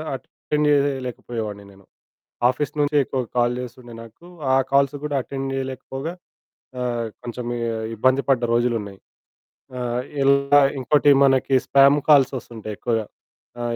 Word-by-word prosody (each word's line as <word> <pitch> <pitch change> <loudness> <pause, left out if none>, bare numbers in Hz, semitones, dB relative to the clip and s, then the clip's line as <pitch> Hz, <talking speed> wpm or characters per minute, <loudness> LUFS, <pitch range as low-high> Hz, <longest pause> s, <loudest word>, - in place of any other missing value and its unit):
Attend 150 +3 -3
చేయలేకపోయేవాడిని 120 -7 -2
నేను. 95 -1 -20 0.6
Office 140 +3 -2
నుంచే 145 0 +2
ఎక్కువ 130 - -4 0.2
కాల్ 120 0 +2
చేస్తుండే 120 -1 -9
నాకు. 115 +9 -16 0.3
ఆ - - +5 0.2
కాల్స్ 140 +1 +3
కూడా 145 -1 -2
అటెండ్ 135 -1 -5
చేయలేకపోగా 135 +4 -5 0.7
ఆహ్, 120 -2 -2 0.2
కొంచెం 120 0 -6
ఇ - - -4 0.4
ఇబ్బంది 130 +5 +2
పడ్డ 130 -3 +3
రోజులున్నాయి. 115 -5 -1 0.8
ఆ! - - -5 0.4
ఇలా 140 +1 +4 0.2
ఇంకోటి 145 +3 +3
మనకి 135 0 +2
స్పామ్ 140 +1 +5
కాల్స్ 140 -3 +6
వస్తుంటాయి 110 -3 -7
ఎక్కువగా. 115 -3 -1 0.6
ఆ! - - -2
130 Hz, 125 wpm, -22 LUFS, 120-140 Hz, 0.8 s, కాల్స్